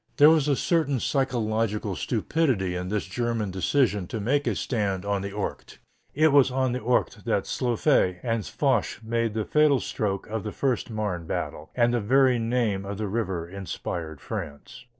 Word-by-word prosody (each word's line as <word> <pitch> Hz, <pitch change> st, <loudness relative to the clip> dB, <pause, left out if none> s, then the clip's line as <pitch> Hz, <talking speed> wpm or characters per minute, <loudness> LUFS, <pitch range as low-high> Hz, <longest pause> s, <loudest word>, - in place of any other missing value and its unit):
There 150 Hz, +2 st, +8 dB
was 155 Hz, -3 st, +3 dB
a 145 Hz, -, +3 dB
certain 145 Hz, -4 st, +1 dB
psychological 110 Hz, -6 st, 0 dB
stupidity 115 Hz, -, 0 dB
in 90 Hz, 0 st, -4 dB
this 105 Hz, -1 st, -1 dB
German 115 Hz, 0 st, -2 dB
decision 105 Hz, 0 st, +1 dB
to 110 Hz, -, -4 dB
make 140 Hz, +8 st, 0 dB
a -, -, +1 dB
stand 100 Hz, -6 st, -1 dB
on 100 Hz, -1 st, 0 dB
the 100 Hz, -, -4 dB
Ourcq. 100 Hz, 0 st, -5 dB, 0.4 s
It 155 Hz, +2 st, +5 dB
was 140 Hz, -2 st, +6 dB
on 130 Hz, 0 st, 0 dB
the 125 Hz, -, -2 dB
Ourcq 125 Hz, +2 st, 0 dB
that -, -, +1 dB
Joffre 120 Hz, -7 st, +1 dB
and 115 Hz, -2 st, -1 dB
Foch 120 Hz, +2 st, 0 dB
made 115 Hz, -1 st, -1 dB
the 110 Hz, -2 st, -1 dB
fatal 150 Hz, -3 st, +4 dB
stroke 100 Hz, -4 st, -2 dB
of 110 Hz, 0 st, -4 dB
the 105 Hz, -, -4 dB
first 130 Hz, 0 st, -1 dB
Marne 105 Hz, -7 st, -3 dB
battle, 75 Hz, -1 st, -4 dB
and 120 Hz, -1 st, +3 dB
the 120 Hz, -, +2 dB
very 130 Hz, +3 st, +4 dB
name 115 Hz, -4 st, 0 dB
of 100 Hz, 0 st, -5 dB
the 105 Hz, 0 st, -2 dB
river 95 Hz, -5 st, -2 dB
inspired 85 Hz, -4 st, -5 dB
France. 75 Hz, +12 st, -7 dB
110 Hz, 175 wpm, -26 LUFS, 100-130 Hz, 0.4 s, There